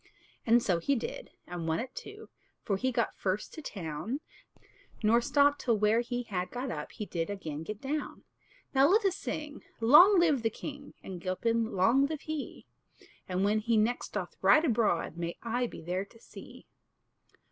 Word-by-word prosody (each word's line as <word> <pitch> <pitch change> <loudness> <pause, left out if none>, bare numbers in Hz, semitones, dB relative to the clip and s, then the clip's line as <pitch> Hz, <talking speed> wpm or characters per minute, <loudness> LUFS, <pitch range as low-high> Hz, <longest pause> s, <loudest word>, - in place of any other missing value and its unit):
And 235 +1 +5
so 175 -4 +1
he 280 +11 +1
did, 230 - -5 0.2
and 175 -2 -5
won 160 0 +1
it 255 +1 -5
too, 420 +2 -9 0.3
For 200 - 0
he 260 +7 0
got 235 -1 -1
first 195 +2 -2
to 315 - -8
town; 180 - -4 0.8
Nor 230 +3 +4
stopped 285 +3 +3
till 235 -3 +2
where 210 +2 +3
he 245 0 -3
had 185 -5 -3
got 250 +1 -4
up - - -6
He 215 - -5
did 165 -3 -3
again 160 -7 -5
get 205 +5 -6
down. 290 +2 -4 0.5
Now 270 +1 +6
let 410 +5 +3
us 375 -2 +2
sing, 300 -5 -5 0.2
Long 345 - +8
live 310 -7 +3
the 225 - +1
king! 285 +5 -9
And 185 -2 -7
Gilpin 225 +5 0
long 230 +9 +4
live 310 -1 -5
he; 310 -2 -6 0.6
And, 185 +1 0
when 210 +2 +2
he 225 +1 +1
next 225 +3 0
doth - - -4
ride 310 +2 +6
abroad, 215 - +1
May 170 0 -4
I 245 +1 0
be 165 - -10
there 180 +3 -2
to 230 +3 -20
see! - - -13
230 Hz, 180 wpm, -30 LUFS, 190-275 Hz, 0.8 s, Long